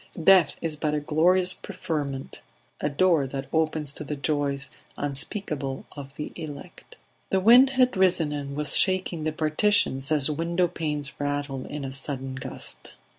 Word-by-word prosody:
Death 185 Hz, -4 st, +5 dB
is 160 Hz, -2 st, -1 dB
but 150 Hz, 0 st, -1 dB
a -, -, +1 dB
glorious 180 Hz, +5 st, +2 dB
preferment, 145 Hz, -8 st, -5 dB, 0.4 s
a -, -, 0 dB
door 160 Hz, -1 st, +2 dB
that 135 Hz, 0 st, -5 dB
opens 155 Hz, -2 st, 0 dB
to -, -, -6 dB
the 150 Hz, +1 st, -4 dB
joys 140 Hz, -1 st, -1 dB, 0.3 s
unspeakable 140 Hz, -, -2 dB
of 140 Hz, -1 st, -10 dB
the 150 Hz, -, -5 dB
elect. 150 Hz, -4 st, -9 dB, 0.3 s
The 190 Hz, -, +2 dB
wind 240 Hz, +7 st, +7 dB
had 255 Hz, -1 st, +4 dB
risen 180 Hz, -5 st, +3 dB
and 140 Hz, -1 st, -5 dB
was 150 Hz, 0 st, +1 dB
shaking 185 Hz, -4 st, +1 dB
the 155 Hz, -, +1 dB
Partitions 155 Hz, -2 st, +1 dB
as 150 Hz, -3 st, +4 dB
window 170 Hz, +4 st, 0 dB
panes 150 Hz, -4 st, -4 dB
rattle 145 Hz, -2 st, -3 dB
in 145 Hz, -1 st, -5 dB
a 135 Hz, -, -5 dB
sudden 135 Hz, -1 st, -4 dB
gust. 130 Hz, -, -6 dB
150 Hz, 155 wpm, -26 LUFS, 140-170 Hz, 0.4 s, wind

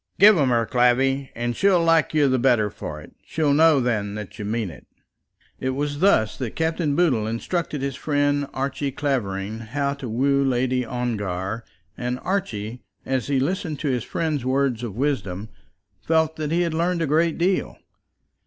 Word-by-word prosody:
"Give 210 Hz, +2 st, +8 dB
'em 135 Hz, -3 st, +3 dB
her, 115 Hz, -1 st, +2 dB
Clavvy, 130 Hz, +4 st, +2 dB
and 120 Hz, 0 st, -2 dB
she'll 190 Hz, -3 st, +3 dB
like 165 Hz, -1 st, +3 dB
you 150 Hz, -2 st, +3 dB
the 130 Hz, -1 st, +2 dB
better 120 Hz, -5 st, +3 dB
for 75 Hz, -6 st, -7 dB
it. -, -, -14 dB
She'll 150 Hz, -3 st, 0 dB
know 155 Hz, -1 st, +5 dB
then 105 Hz, -5 st, -1 dB
that 105 Hz, +1 st, -8 dB
you 105 Hz, -, -4 dB
mean 110 Hz, -3 st, -2 dB
it." -, -, -15 dB, 0.7 s
It 130 Hz, 0 st, -2 dB
was 145 Hz, +1 st, -2 dB
thus 165 Hz, -, +3 dB
that 125 Hz, -5 st, -4 dB
Captain 160 Hz, -2 st, 0 dB
Boodle 135 Hz, -11 st, +2 dB
instructed 145 Hz, +5 st, -2 dB
his 140 Hz, -1 st, -2 dB
friend 145 Hz, -1 st, 0 dB
Archie 140 Hz, +1 st, -2 dB
Clavering 110 Hz, -7 st, -2 dB
how 140 Hz, +5 st, -2 dB
to 140 Hz, -4 st, -7 dB
woo 140 Hz, +4 st, +2 dB
Lady 130 Hz, -1 st, +1 dB
Ongar; 110 Hz, -4 st, -3 dB, 0.3 s
and 125 Hz, 0 st, -3 dB
Archie, 125 Hz, -, -3 dB, 0.2 s
as 130 Hz, -3 st, -1 dB
he 140 Hz, -2 st, +1 dB
listened 155 Hz, +1 st, -1 dB
to 150 Hz, -, 0 dB
his 125 Hz, -3 st, 0 dB
friend's 155 Hz, -5 st, -2 dB
words 130 Hz, -2 st, +1 dB
of 115 Hz, -5 st, -5 dB
wisdom, 110 Hz, -7 st, -2 dB, 0.5 s
felt 160 Hz, -1 st, +1 dB
that 155 Hz, -1 st, -3 dB
he 170 Hz, +2 st, +2 dB
had 170 Hz, -2 st, 0 dB
learned 170 Hz, +1 st, 0 dB
a -, -, +1 dB
great 160 Hz, +3 st, +2 dB
deal. 185 Hz, +2 st, 0 dB
135 Hz, 175 wpm, -23 LUFS, 115-155 Hz, 0.7 s, Give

